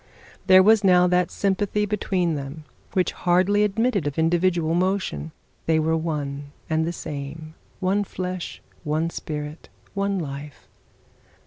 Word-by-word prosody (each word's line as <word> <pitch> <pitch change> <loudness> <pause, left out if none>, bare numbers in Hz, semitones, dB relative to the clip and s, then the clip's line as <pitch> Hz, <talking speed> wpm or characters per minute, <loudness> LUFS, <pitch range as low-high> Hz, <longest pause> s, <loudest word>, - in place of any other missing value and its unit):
There 185 0 +8
was 215 +1 +5
now 180 -2 +6
that 180 0 +2
sympathy 205 +1 0
between 190 -4 0
them 145 +2 -6 0.3
which 185 -1 +2
hardly 185 +4 +2
admitted 210 - +1
of 145 - -4
individual 170 0 +2
motion. 175 - -1 0.4
They 160 -1 +4
were 160 +1 +2
one 145 -3 -3
and 160 0 +1
the - - 0
same, 155 0 -7 0.3
one 195 +2 +1
flesh, 185 -2 -5 0.2
one 160 +2 0
spirit, 150 0 -6 0.2
one 200 0 0
life. 145 -3 -7
175 Hz, 130 wpm, -24 LUFS, 155-190 Hz, 0.4 s, There